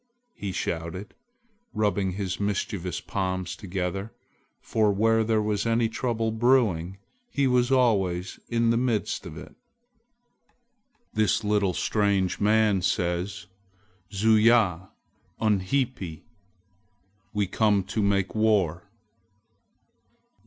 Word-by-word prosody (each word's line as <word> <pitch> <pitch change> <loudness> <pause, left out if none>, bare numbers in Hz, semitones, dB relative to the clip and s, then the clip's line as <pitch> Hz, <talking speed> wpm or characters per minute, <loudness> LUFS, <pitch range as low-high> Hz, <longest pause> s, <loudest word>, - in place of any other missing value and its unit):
he 100 - -5
shouted, 85 +3 -4 0.6
rubbing 100 -3 0
his 95 -1 -3
mischievous 100 -3 -2
palms 95 -2 -3
together, 95 +2 -4 0.5
for 110 -2 +1
where 110 +3 +2
there 110 -1 +1
was 105 -1 0
any 115 0 +2
trouble 115 -1 -1
brewing, 110 -7 +2 0.3
he 140 - 0
was 125 0 +2
always 100 -8 +1
in 115 -1 +2
the 115 - +2
midst 120 -4 -1
of - - -9
it. - - -10 1.6
"This 110 0 +1
little 105 -3 +1
strange 100 -3 +1
man 105 -2 +3
says, 90 +3 -1 0.7
'Zuya 105 -3 +3 0.5
unhipi! 105 - -1 1.1
We 105 -2 0
come 100 0 +2
to 100 +3 -3
make 100 -1 +1
war!'" 100 -4 +1
105 Hz, 100 wpm, -26 LUFS, 95-110 Hz, 1.6 s, man